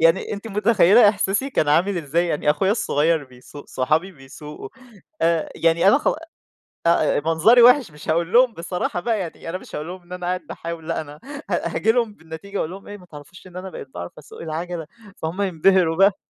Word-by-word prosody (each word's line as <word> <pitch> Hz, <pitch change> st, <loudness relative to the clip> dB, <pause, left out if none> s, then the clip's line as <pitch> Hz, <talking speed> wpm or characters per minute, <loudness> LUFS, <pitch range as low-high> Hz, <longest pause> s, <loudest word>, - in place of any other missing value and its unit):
يعني 165 Hz, +6 st, +3 dB
أنتِ 205 Hz, +2 st, -6 dB
متخيلة 210 Hz, 0 st, +5 dB
إحساسي 205 Hz, +5 st, 0 dB
كان 155 Hz, -, 0 dB
عامل 180 Hz, +6 st, +2 dB
إزاي، 165 Hz, +3 st, 0 dB
يعني 150 Hz, -2 st, 0 dB
أخويا 170 Hz, +6 st, +1 dB
الصغير 160 Hz, -7 st, +1 dB
بيسُوق، 130 Hz, +3 st, -14 dB
صحابي 155 Hz, +9 st, 0 dB
بيسُوقُوا، 135 Hz, 0 st, -11 dB, 0.5 s
آآ، 165 Hz, -1 st, +1 dB
يعني 165 Hz, +3 st, +3 dB
أنا 275 Hz, -, +6 dB
خ -, -, 0 dB, 0.8 s
آآ، 155 Hz, -3 st, +3 dB
منظري 170 Hz, +10 st, +5 dB
وِحِش 245 Hz, -, +6 dB
مش 150 Hz, +1 st, -11 dB
هاقول 170 Hz, +4 st, 0 dB
لهم 245 Hz, -1 st, +5 dB
بصراحة 175 Hz, +1 st, -3 dB
بقى 225 Hz, +2 st, -1 dB
يعني، 165 Hz, -2 st, -6 dB
أنا 185 Hz, -, -3 dB
مش -, -, -11 dB
هاقول 150 Hz, +2 st, -5 dB
لهم 185 Hz, +1 st, -8 dB
إن 175 Hz, -, -22 dB
أنا 180 Hz, -1 st, -6 dB
قاعد 180 Hz, 0 st, -1 dB
باحاول، 165 Hz, -1 st, -7 dB
لا 165 Hz, -, -1 dB
أنا 150 Hz, 0 st, -11 dB, 0.3 s
ه -, -, -1 dB
هاجي 225 Hz, -, +1 dB
لهم 230 Hz, -3 st, 0 dB
بالنتيجة 165 Hz, +4 st, -9 dB
أقول 155 Hz, -, -2 dB
لهم 195 Hz, +3 st, -10 dB
إيه 205 Hz, -, -8 dB
ما 180 Hz, -, -16 dB
تعرفوش 160 Hz, +3 st, -13 dB
إن 180 Hz, 0 st, -11 dB
أنا 190 Hz, +1 st, -6 dB
بقيت 140 Hz, -, -9 dB
باعرف 85 Hz, 0 st, -7 dB
أَسُوق 150 Hz, -, -13 dB
العَجَلة، 165 Hz, 0 st, -5 dB, 0.3 s
فهُم 165 Hz, +5 st, -4 dB
ينبهروا 180 Hz, -2 st, +2 dB
بقى. 195 Hz, +1 st, +4 dB
175 Hz, 200 wpm, -22 LUFS, 160-195 Hz, 0.8 s, أنا